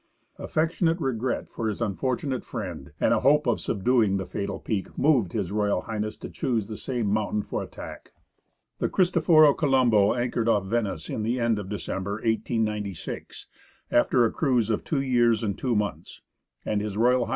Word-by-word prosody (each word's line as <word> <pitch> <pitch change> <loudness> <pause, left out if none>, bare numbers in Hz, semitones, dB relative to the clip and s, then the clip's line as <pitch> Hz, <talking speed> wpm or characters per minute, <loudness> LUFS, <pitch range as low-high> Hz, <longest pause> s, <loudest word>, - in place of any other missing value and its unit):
Affectionate 165 +1 0
regret 130 -4 -2
for 115 - -4
his 105 - -2
unfortunate 125 +5 -2
friend, 90 - -6
and - - +3
a - - +3
hope 150 +3 +4
of 120 -3 +1
subduing 110 -1 +2
the 95 - -3
fatal 100 +1 -4
peak, 100 -4 -3
moved 130 - +2
H.R. 100 -1 0 0.2
H. 110 0 -4
to - - -7
choose 115 -5 -2
the 110 - -6
same 120 0 -3
mountain 105 0 0
for - - -3
attack. - - -9 0.7
The - - 0
Cristoforo 165 -5 +5
Colombo 125 -9 +3
anchored 120 -1 0
off 100 -4 +2
Venice 95 -6 -2
at - - -2
the 120 +4 -1
end 115 -3 +1
of 100 -2 -7
December, 100 -1 -3
1896, 110 -3 -3 0.5
after 120 0 +4
a 115 - +1
cruise 125 -7 +1
of 110 - -1
two 145 -4 -1
years 120 -4 +2
and 100 -3 -1
two 125 -3 -1
months, 105 -1 -3 0.4
and 105 -1 0
H.R. 115 +5 +2
H. 115 - -2
115 Hz, 165 wpm, -26 LUFS, 105-130 Hz, 0.7 s, Cristoforo